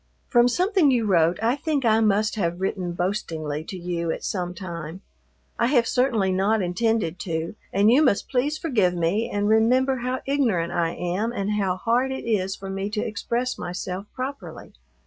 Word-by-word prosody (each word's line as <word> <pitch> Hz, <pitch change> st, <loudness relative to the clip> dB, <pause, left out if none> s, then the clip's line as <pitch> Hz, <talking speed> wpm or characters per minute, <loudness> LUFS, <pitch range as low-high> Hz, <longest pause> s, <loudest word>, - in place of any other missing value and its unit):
From 240 Hz, -1 st, +5 dB
something 360 Hz, -, +3 dB
you 240 Hz, -4 st, +2 dB
wrote 170 Hz, -3 st, +3 dB
I 235 Hz, +3 st, +3 dB
think 290 Hz, -2 st, -1 dB
I 220 Hz, -1 st, +4 dB
must 215 Hz, -1 st, +2 dB
have 175 Hz, -4 st, -1 dB
written 185 Hz, -2 st, -2 dB
boastingly 165 Hz, -5 st, -3 dB
to 190 Hz, -, -7 dB
you 170 Hz, -1 st, -3 dB
at -, -, -3 dB
some 180 Hz, -2 st, -3 dB
time. 170 Hz, -1 st, -7 dB, 0.6 s
I 235 Hz, -, +3 dB
have 245 Hz, -3 st, +3 dB
certainly 230 Hz, -7 st, +1 dB
not 200 Hz, +4 st, +2 dB
intended 185 Hz, -1 st, 0 dB
to, 165 Hz, -2 st, -3 dB, 0.2 s
and 205 Hz, +3 st, +4 dB
you 265 Hz, +5 st, +5 dB
must 260 Hz, -9 st, +2 dB
please 280 Hz, +4 st, 0 dB
forgive 210 Hz, -, +1 dB
me 175 Hz, +7 st, 0 dB
and 205 Hz, 0 st, -1 dB
remember 250 Hz, +5 st, +3 dB
how 255 Hz, +1 st, -3 dB
ignorant 230 Hz, -12 st, +1 dB
I 170 Hz, -1 st, 0 dB
am 185 Hz, +6 st, -2 dB
and 205 Hz, -3 st, -2 dB
how 195 Hz, -3 st, 0 dB
hard 240 Hz, +6 st, +1 dB
it 265 Hz, -, -5 dB
is 195 Hz, -4 st, 0 dB
for 195 Hz, -, -9 dB
me 195 Hz, +1 st, -3 dB
to 210 Hz, 0 st, -2 dB
express 235 Hz, +3 st, -2 dB
myself 180 Hz, +2 st, -5 dB
properly. 270 Hz, +2 st, -6 dB
210 Hz, 180 wpm, -24 LUFS, 180-245 Hz, 0.6 s, From